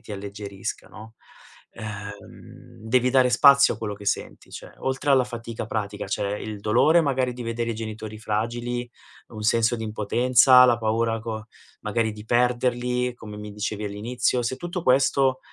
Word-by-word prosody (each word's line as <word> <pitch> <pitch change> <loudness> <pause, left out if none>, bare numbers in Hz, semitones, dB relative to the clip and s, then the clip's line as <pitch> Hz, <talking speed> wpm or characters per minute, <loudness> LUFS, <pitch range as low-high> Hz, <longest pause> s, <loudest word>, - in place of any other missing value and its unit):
ti 105 - -10
alleggerisca, 100 0 -6
no, 110 +1 -13 0.6
uhm, 100 -2 -10
devi 125 +1 +3
dare 130 -1 +4
spazio 140 +2 +6
a - - -12
quello 105 -2 -4
che 100 - -12
senti. - - -3
Cioè, - - -10
oltre 135 +2 -3
alla 130 -2 +5
fatica 115 -2 -6
pratica, 105 -2 -4
c'è 100 +1 -2
il 105 -2 -7
dolore 155 +11 +4
magari 130 -4 0
di 125 - -7
vedere 115 0 -3
i - - -3
genitori 110 -1 -7
fragili, 120 +3 -3 0.4
un 110 - -10
senso 115 +1 +2
di 115 - -6
impotenza, 125 +4 +5
la 120 -2 +4
paura 115 0 0
co 110 -1 -6 0.4
magari 110 +1 -1
di 105 0 -11
perderli, 125 +1 +1
come 105 -3 -10
mi 105 0 -8
dicevi 105 0 -4
all'inizio. 120 +5 -1
Se 125 +2 -2
tutto 175 0 -5
questo, 135 0 +3
115 Hz, 160 wpm, -24 LUFS, 105-125 Hz, 0.6 s, spazio